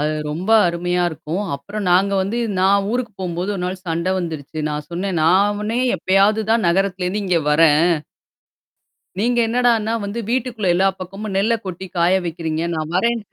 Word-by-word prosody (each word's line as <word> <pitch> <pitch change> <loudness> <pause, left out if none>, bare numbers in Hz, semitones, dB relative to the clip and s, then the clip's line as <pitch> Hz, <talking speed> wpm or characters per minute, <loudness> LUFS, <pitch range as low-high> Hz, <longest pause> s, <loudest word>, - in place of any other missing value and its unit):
அது 155 - 0 0.2
ரொம்ப 175 +8 -3 0.2
அருமையா 175 +1 -1
இருக்கும். 160 +4 -4
அப்புறம் 205 +8 -6
நாங்க 190 +3 +3
வந்து, 205 +5 -2 0.2
நான் 195 +1 +3
ஊருக்கு 245 -2 -2
போகும்போது 180 +2 -2
1 185 - -4
நாள் 185 0 -5
சண்டை 170 +2 -1
வந்துருச்சு. 160 -3 -5
நான் 150 0 -4
சொன்னேன், 180 +1 -2
"நானே 205 +6 +2 0.2
எப்பயாவது 195 +5 +2
தான் 225 -5 +2
நகரத்திலிருந்து 190 +2 0
இங்கே 175 -3 +2
வர்றேன்." 160 +2 +4 1.3
நீங்க 240 +4 +1
என்னடான்னா 230 -2 +1
வந்து 200 +3 -4
வீட்டுக்குள்ள 240 -5 -1
எல்லா 190 +2 +3
பக்கமும் 195 +3 -6
நெல்ல 220 +4 +2
கொட்டி 190 0 -6
காய 170 +2 +3
வைக்கிறீங்க. 160 -1 -3
நான் 155 0 -4
வர்றேன்ட்டே 215 +1 0
190 Hz, 155 wpm, -20 LUFS, 170-210 Hz, 1.3 s, வர்றேன்